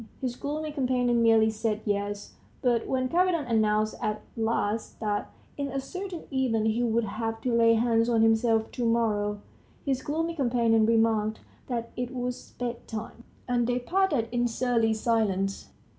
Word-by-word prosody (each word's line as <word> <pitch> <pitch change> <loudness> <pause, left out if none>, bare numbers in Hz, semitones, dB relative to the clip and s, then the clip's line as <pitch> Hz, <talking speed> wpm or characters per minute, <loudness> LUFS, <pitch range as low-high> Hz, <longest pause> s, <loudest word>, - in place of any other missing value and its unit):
His 250 -2 -3
gloomy 300 +3 -4
companion 250 -4 +1
merely 225 -1 +5
said 215 -1 -2
yes; 205 0 -2 0.3
but 240 -3 +2
when 255 -1 0
Kapiton 345 0 +2
announced 215 -1 +2
at 210 0 -2
last 225 -1 -1
that, 210 -2 -2 0.3
in 280 -1 -2
a 275 0 -3
certain 370 +5 -6
event, 240 -5 +1
he 220 +2 +1
would 235 -1 +1
have 225 +1 -3
to 250 - -1
lay 230 0 +5
hands 230 0 +2
on 225 -2 +3
himself 225 0 +3
to 245 - -3
morrow, 210 -3 +1 0.4
his 265 -2 0
gloomy 325 +4 -2
companion 235 -6 +2
remarked 225 -1 +2 0.3
that 235 -2 -3
it 250 +1 -4
was 250 0 -5
bedtime. 235 -1 -6 0.2
And 240 -1 +1
they 245 0 +1
parted 305 -3 +1
in 240 0 +1
surly 230 -2 +1
silence. 205 -4 0
230 Hz, 155 wpm, -27 LUFS, 220-250 Hz, 0.4 s, merely